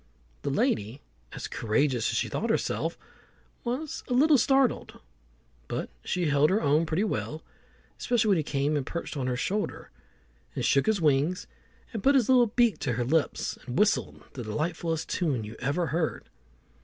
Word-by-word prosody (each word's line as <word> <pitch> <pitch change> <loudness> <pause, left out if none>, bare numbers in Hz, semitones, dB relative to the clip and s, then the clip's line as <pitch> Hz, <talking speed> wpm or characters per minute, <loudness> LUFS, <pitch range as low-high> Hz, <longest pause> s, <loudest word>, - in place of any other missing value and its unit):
The - - -2
lady, 110 +7 0 0.3
as - - -6
courageous 120 +1 0
as - - -1
she - - 0
thought - - -2
herself, - - -1 0.7
was 265 +6 -3
a 250 - 0
little 290 +1 +5
startled, 270 +1 +2 0.7
but - - -3
she 180 -1 -1
held 145 0 +3
her 200 - +2
own 155 -1 +2
pretty 160 +6 0
well, 160 -6 -3 0.6
especially 235 -3 +1
when 195 - +4
he - - +2
came 145 +1 0
and 145 - 0
perched 170 +3 -5
on 130 -3 -2
her 125 -1 -1
shoulder, 205 +10 -3 0.6
and - - -1
shook 140 - +3
his 220 -2 +2
wings, 150 +4 +2 0.5
and 220 - -3
put 280 +6 +4
his 255 -4 +3
little 250 -2 +6
beak 235 0 +2
to 125 - -1
her 120 +1 -1
lips, 155 +4 0
and 125 - -4
whistled 210 0 +1
the 130 - -6
delightfulest 160 +7 -2
tune 145 -10 -1
you 105 +2 -8
ever 145 +7 0
heard. 165 -1 -1
160 Hz, 170 wpm, -28 LUFS, 140-215 Hz, 0.7 s, little